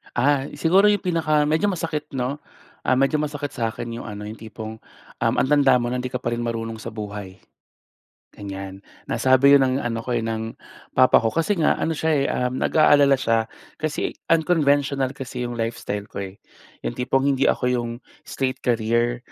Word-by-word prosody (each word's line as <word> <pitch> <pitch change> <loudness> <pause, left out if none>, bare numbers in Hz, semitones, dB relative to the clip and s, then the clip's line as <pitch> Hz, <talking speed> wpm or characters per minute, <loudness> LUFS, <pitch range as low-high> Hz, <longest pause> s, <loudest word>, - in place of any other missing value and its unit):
Ah, 135 +2 +2
siguro 185 +7 +4
yung 205 -1 +2
pinaka 160 -4 +2
medyo 160 +7 +1
masakit, 160 -5 -2
'no, 130 +3 -2 0.5
ah, 130 - +4
medyo 135 +4 +2
masakit 145 -1 -3
sa 115 -2 -1
akin 115 +1 -5
yung - - -8
ano 105 -1 -7
yung 105 +1 -8
tipong, 110 0 -8 0.4
um, - - +2
"Ang - - +2
tanda 140 -3 +5
mo 120 -1 0
na 125 - -1
di 125 - -3
ka 125 0 -5
pa 120 - -1
rin 120 - -2
marunong 115 -1 -3
sa - - -8
buhay." 105 -3 -7 1.0
Ganyan, 95 -1 -7 0.3
nasabi 135 +2 +5
yun - - +1
ng 130 -1 +2
ano 115 -1 -2
ko, 125 - -1
eh, 120 - 0
ng 110 0 -3 0.4
papa 130 0 +6
ko 115 -1 -1
kasi 170 +4 +1
nga 155 - +3
ano - - -1
siya, 160 - 0
eh, 140 -2 +2
um, 125 +1 -1
nag-aalala 145 -3 +5
siya 115 -3 +1 0.3
kasi, 155 0 -2 0.2
unconventional 145 -5 +2
kasi 125 -2 -6
yung 120 - -4
lifestyle 115 -3 -3
ko, 100 - -5
eh. 100 - -23 0.5
Yung - - -2
tipong 135 +2 0
hindi 135 -1 +3
ako 125 - -1
'yong 120 -1 -2 0.3
straight 130 -1 -3
career, 120 +1 +1
125 Hz, 185 wpm, -23 LUFS, 115-145 Hz, 1.0 s, papa